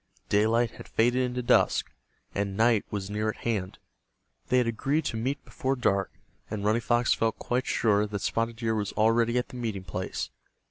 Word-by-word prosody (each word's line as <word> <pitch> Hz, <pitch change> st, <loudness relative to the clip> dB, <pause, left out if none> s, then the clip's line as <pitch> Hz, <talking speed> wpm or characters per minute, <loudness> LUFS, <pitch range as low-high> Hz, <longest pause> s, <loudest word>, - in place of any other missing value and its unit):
Daylight 115 Hz, +3 st, +3 dB
had -, -, -11 dB
faded 120 Hz, +3 st, +2 dB
into 125 Hz, 0 st, -1 dB
dusk, -, -, +3 dB, 0.4 s
and 100 Hz, -1 st, -2 dB
night 115 Hz, -1 st, +4 dB
was 100 Hz, -1 st, -4 dB
near 105 Hz, +1 st, 0 dB
at -, -, -3 dB
hand. 105 Hz, -6 st, -1 dB, 0.7 s
They 125 Hz, -, +3 dB
had 125 Hz, -, +4 dB
agreed 135 Hz, +7 st, 0 dB
to -, -, -2 dB
meet 130 Hz, +5 st, -2 dB
before 135 Hz, +1 st, -1 dB
dark, 100 Hz, -7 st, +1 dB, 0.4 s
and 105 Hz, -1 st, -3 dB
Running 110 Hz, +3 st, +2 dB
Fox 120 Hz, +1 st, +2 dB
felt 115 Hz, -1 st, 0 dB
quite 125 Hz, +2 st, -1 dB
sure 105 Hz, -2 st, +2 dB
that 100 Hz, -1 st, -4 dB
Spotted 115 Hz, 0 st, -1 dB
Deer 115 Hz, -1 st, -1 dB
was 105 Hz, -2 st, -2 dB
already 115 Hz, +2 st, +3 dB
at 125 Hz, -, -1 dB
the 130 Hz, -, -9 dB
meeting 110 Hz, -6 st, -3 dB
place. 90 Hz, +1 st, -4 dB
115 Hz, 185 wpm, -28 LUFS, 105-120 Hz, 0.7 s, night